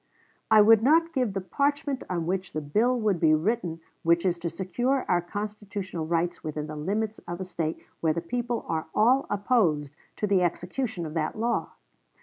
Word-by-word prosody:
I 215 Hz, -, +8 dB
would 220 Hz, +1 st, +7 dB
not 330 Hz, +6 st, +4 dB
give 250 Hz, -8 st, 0 dB
the 195 Hz, -, -2 dB
parchment 285 Hz, +5 st, -1 dB
on 170 Hz, -3 st, -1 dB
which 185 Hz, +2 st, -2 dB
the 155 Hz, -, -2 dB
bill 225 Hz, -, +1 dB
would 210 Hz, -6 st, +1 dB
be 155 Hz, -1 st, +5 dB
written 170 Hz, -1 st, -1 dB, 0.2 s
which 170 Hz, +2 st, +3 dB
is 175 Hz, -2 st, +1 dB
to 170 Hz, -, -2 dB
secure 240 Hz, +10 st, -1 dB
our 175 Hz, -1 st, +3 dB
constitutional 200 Hz, -3 st, -5 dB
rights 170 Hz, +1 st, -1 dB
within 150 Hz, -1 st, -3 dB
the 155 Hz, 0 st, -7 dB
limits 210 Hz, +8 st, -2 dB
of 175 Hz, +1 st, -5 dB
a 190 Hz, -, -4 dB
State 165 Hz, -3 st, -3 dB, 0.2 s
where 160 Hz, -, +2 dB
the 170 Hz, -, -1 dB
people 240 Hz, +7 st, -3 dB
are 160 Hz, 0 st, -2 dB
all 250 Hz, +5 st, +4 dB
opposed 175 Hz, -, +1 dB, 0.2 s
to -, -, -1 dB
the 195 Hz, -2 st, +3 dB
execution 180 Hz, +3 st, -2 dB
of 155 Hz, -, -6 dB
that 160 Hz, +2 st, -2 dB
law. 235 Hz, +2 st, -1 dB
190 Hz, 185 wpm, -27 LUFS, 165-225 Hz, 0.2 s, I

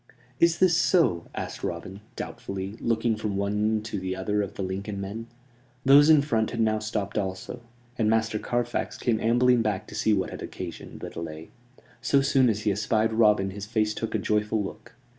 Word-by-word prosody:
"Is 170 Hz, 0 st, +4 dB
this 185 Hz, -3 st, +4 dB
so?" 160 Hz, -, +2 dB
asked -, -, -5 dB
Robin, 95 Hz, +4 st, -5 dB
doubtfully, 95 Hz, +1 st, -5 dB
looking 115 Hz, 0 st, +1 dB
from 105 Hz, -2 st, -3 dB
one 105 Hz, +2 st, 0 dB
to 110 Hz, -2 st, -4 dB
the 95 Hz, 0 st, -3 dB
other 105 Hz, +2 st, 0 dB
of 100 Hz, 0 st, -5 dB
the 100 Hz, -, -3 dB
Lincoln 100 Hz, +2 st, -4 dB
men. 105 Hz, +4 st, -5 dB, 0.6 s
Those 145 Hz, +3 st, +7 dB
in 155 Hz, -3 st, +7 dB
front 110 Hz, -6 st, 0 dB
had -, -, -5 dB
now 110 Hz, -1 st, +2 dB
stopped 105 Hz, -1 st, -2 dB
also; 95 Hz, +4 st, -5 dB, 0.4 s
and 110 Hz, -2 st, +3 dB
Master 110 Hz, -1 st, +1 dB
Carfax 120 Hz, +1 st, -2 dB
came 115 Hz, -3 st, 0 dB
ambling 120 Hz, +2 st, +3 dB
back 105 Hz, -4 st, -1 dB
to -, -, -10 dB
see 110 Hz, -, +2 dB
what 95 Hz, -2 st, -2 dB
had -, -, -7 dB
occasioned 85 Hz, -3 st, -8 dB
the -, -, -6 dB
delay. 80 Hz, -1 st, -7 dB, 0.5 s
So 135 Hz, +3 st, +3 dB
soon 135 Hz, -2 st, +4 dB
as 105 Hz, -1 st, -1 dB
he 105 Hz, -, +1 dB
espied 110 Hz, +2 st, +1 dB
Robin 105 Hz, -3 st, +3 dB
his 100 Hz, +1 st, -7 dB
face 110 Hz, -1 st, +1 dB
took 115 Hz, +1 st, -4 dB
a -, -, +4 dB
joyful 105 Hz, +1 st, 0 dB
look. 95 Hz, -, -9 dB
110 Hz, 190 wpm, -26 LUFS, 100-115 Hz, 0.6 s, Those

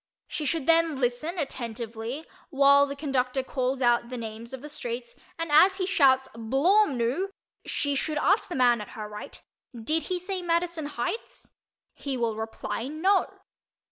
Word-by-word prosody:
She 305 Hz, -, -4 dB
should 320 Hz, -1 st, -1 dB
then 330 Hz, -3 st, +3 dB
listen 255 Hz, +8 st, -1 dB
attentively 235 Hz, -1 st, -4 dB, 0.2 s
while 280 Hz, -1 st, +5 dB
the 280 Hz, -, -5 dB
conductor 265 Hz, -2 st, -1 dB
calls 260 Hz, 0 st, -1 dB
out 240 Hz, -1 st, +3 dB
the 250 Hz, -, -5 dB
names 225 Hz, 0 st, -7 dB
of 265 Hz, 0 st, -7 dB
the -, -, -6 dB
streets 240 Hz, -4 st, -5 dB, 0.2 s
and 330 Hz, -2 st, -3 dB
as 365 Hz, +6 st, +7 dB
he 380 Hz, -1 st, -1 dB
shouts 265 Hz, -8 st, +4 dB
"Blawmnoo!" 270 Hz, -, +2 dB, 0.4 s
she 285 Hz, -2 st, 0 dB
should 300 Hz, +2 st, -1 dB
ask 390 Hz, +8 st, +2 dB
the 350 Hz, -, -4 dB
man 245 Hz, -3 st, +4 dB
at 210 Hz, -, -8 dB
her 215 Hz, -1 st, -5 dB
right 210 Hz, 0 st, -9 dB, 0.4 s
"Did 310 Hz, +9 st, 0 dB
he 365 Hz, -, 0 dB
say 365 Hz, +1 st, -4 dB
Madison 340 Hz, -2 st, -1 dB
Heights?" 295 Hz, -, -5 dB, 0.4 s
He 275 Hz, -2 st, -4 dB
will 230 Hz, -2 st, 0 dB
reply 225 Hz, +2 st, -4 dB
"No." 360 Hz, +7 st, +1 dB
275 Hz, 160 wpm, -27 LUFS, 240-330 Hz, 0.4 s, as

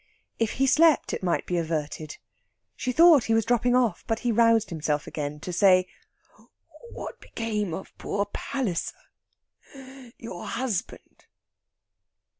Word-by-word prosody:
If 225 Hz, -2 st, 0 dB
he 270 Hz, -, +1 dB
slept 310 Hz, +2 st, +4 dB
it -, -, -3 dB
might 175 Hz, -2 st, 0 dB
be 180 Hz, -, -2 dB
averted. 155 Hz, -2 st, -4 dB, 0.6 s
She 255 Hz, -, -2 dB
thought 320 Hz, -2 st, +6 dB
he 225 Hz, -, +2 dB
was 225 Hz, -2 st, +2 dB
dropping 245 Hz, +1 st, +2 dB
off, 235 Hz, -8 st, +1 dB
but 225 Hz, 0 st, -1 dB
he 245 Hz, -, 0 dB
roused 230 Hz, -1 st, +3 dB
himself 150 Hz, -2 st, -2 dB
again 150 Hz, 0 st, -5 dB
to 180 Hz, -, -5 dB
say: 185 Hz, 0 st, +5 dB, 1.1 s
"What -, -, -8 dB
became 215 Hz, -4 st, -3 dB
of 190 Hz, +4 st, -7 dB
poor 200 Hz, 0 st, -2 dB
Palliser 205 Hz, -3 st, -3 dB, 1.2 s
your 205 Hz, -7 st, -8 dB
husband?" 230 Hz, -6 st, -4 dB
215 Hz, 130 wpm, -26 LUFS, 175-245 Hz, 1.2 s, thought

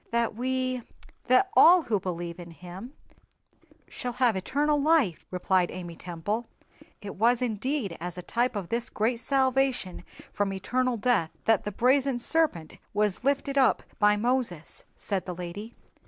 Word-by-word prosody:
"That 235 Hz, 0 st, 0 dB
we—that 255 Hz, -, -1 dB
all 350 Hz, +1 st, +8 dB
who 215 Hz, -7 st, 0 dB
believe 175 Hz, -2 st, -5 dB
in 175 Hz, -1 st, -9 dB
Him 180 Hz, -, -10 dB, 0.9 s
shall 245 Hz, -1 st, -5 dB
have 245 Hz, -3 st, +2 dB
eternal 290 Hz, +9 st, 0 dB
life," 285 Hz, -, +2 dB
replied 180 Hz, 0 st, +1 dB
Amy 175 Hz, -2 st, -7 dB
Temple. 180 Hz, +8 st, -4 dB, 0.6 s
"It 200 Hz, -2 st, -7 dB
was 235 Hz, +4 st, +3 dB
indeed 240 Hz, -, -2 dB
as 175 Hz, 0 st, -5 dB
a 180 Hz, -, -6 dB
type 240 Hz, +5 st, 0 dB
of 195 Hz, -4 st, -4 dB
this 235 Hz, +1 st, -1 dB
great 230 Hz, +3 st, 0 dB
salvation 265 Hz, -8 st, 0 dB, 0.3 s
from 200 Hz, -1 st, -1 dB
eternal 250 Hz, +6 st, -1 dB
death 215 Hz, -7 st, +1 dB, 0.2 s
that 225 Hz, -3 st, +3 dB
the 210 Hz, -, -2 dB
brazen 260 Hz, +4 st, +2 dB
serpent 240 Hz, -, -1 dB, 0.2 s
was 210 Hz, 0 st, 0 dB
lifted 275 Hz, 0 st, +1 dB
up 260 Hz, -, +3 dB, 0.2 s
by 210 Hz, -1 st, +4 dB
Moses," 230 Hz, -, -2 dB
said 195 Hz, -3 st, -3 dB
the 180 Hz, -, -4 dB
lady. 180 Hz, +6 st, -7 dB
230 Hz, 145 wpm, -27 LUFS, 185-255 Hz, 0.9 s, all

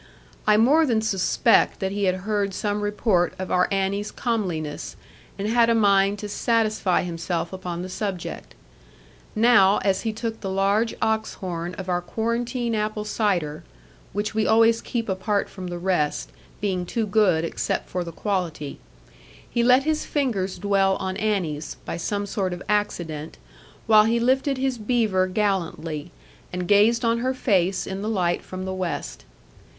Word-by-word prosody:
I 210 Hz, 0 st, +6 dB
more 280 Hz, +9 st, +5 dB
than 225 Hz, -3 st, +1 dB
suspect 195 Hz, -4 st, +2 dB
that 190 Hz, 0 st, -1 dB
he 200 Hz, 0 st, -1 dB
had 185 Hz, 0 st, 0 dB
heard 205 Hz, -2 st, 0 dB
some 205 Hz, 0 st, -1 dB
report 205 Hz, -4 st, +1 dB
of 185 Hz, -, -5 dB
our 180 Hz, -, +3 dB
Annie's 195 Hz, +1 st, 0 dB
comeliness, 180 Hz, -11 st, -3 dB, 0.4 s
and 200 Hz, +1 st, -2 dB
had 230 Hz, +1 st, +4 dB
a 230 Hz, -, +4 dB
mind 200 Hz, -2 st, +3 dB
to 210 Hz, -, -6 dB
satisfy 215 Hz, -3 st, +1 dB
himself 170 Hz, 0 st, -3 dB
upon 180 Hz, -2 st, -5 dB
the -, -, -5 dB
subject. 185 Hz, -, -5 dB, 0.8 s
Now, 215 Hz, -3 st, +5 dB
as 195 Hz, -1 st, +1 dB
he 225 Hz, -, -1 dB
took 225 Hz, +1 st, -4 dB
the 195 Hz, -, -3 dB
large 200 Hz, +4 st, +1 dB
ox 220 Hz, 0 st, 0 dB
horn 175 Hz, -1 st, -5 dB
of 190 Hz, -, -7 dB
our 180 Hz, -1 st, 0 dB
quarantine 235 Hz, +5 st, -2 dB
apple 215 Hz, 0 st, -2 dB
cider 180 Hz, -9 st, -1 dB, 0.5 s
(which 205 Hz, +2 st, -2 dB
we 220 Hz, 0 st, +1 dB
always 225 Hz, +1 st, +4 dB
keep 230 Hz, -2 st, -3 dB
apart 200 Hz, +1 st, 0 dB
from 185 Hz, -2 st, -8 dB
the 175 Hz, 0 st, -4 dB
rest, 165 Hz, -, -1 dB, 0.3 s
being 190 Hz, -3 st, 0 dB
too 220 Hz, +5 st, -2 dB
good 195 Hz, -6 st, +3 dB
except -, -, -2 dB
for 180 Hz, 0 st, -3 dB
the 170 Hz, -, -7 dB
quality), 165 Hz, -6 st, -3 dB, 0.7 s
he 235 Hz, -, 0 dB
let 250 Hz, +3 st, +5 dB
his 310 Hz, +1 st, 0 dB
fingers 220 Hz, -10 st, -1 dB
dwell 195 Hz, -1 st, +2 dB
on 190 Hz, 0 st, -3 dB
Annie's, 175 Hz, -9 st, -2 dB
by -, -, -4 dB
some 205 Hz, +4 st, -2 dB
sort 195 Hz, -2 st, -2 dB
of 175 Hz, -, -7 dB
accident, 175 Hz, -7 st, -2 dB, 0.5 s
while 215 Hz, -1 st, +6 dB
he 230 Hz, +1 st, +2 dB
lifted 265 Hz, +3 st, +2 dB
his 260 Hz, -2 st, -1 dB
beaver 210 Hz, -5 st, +1 dB
gallantly, 175 Hz, -5 st, -2 dB, 0.4 s
and 180 Hz, 0 st, -3 dB
gazed 215 Hz, +4 st, +4 dB
on 230 Hz, 0 st, +2 dB
her 260 Hz, +2 st, -1 dB
face 190 Hz, -7 st, +1 dB
in 190 Hz, +1 st, -5 dB
the 215 Hz, -, -2 dB
light 180 Hz, -5 st, 0 dB
from 185 Hz, 0 st, -7 dB
the 190 Hz, -, -3 dB
west. 170 Hz, -, -4 dB
200 Hz, 165 wpm, -24 LUFS, 180-220 Hz, 0.8 s, I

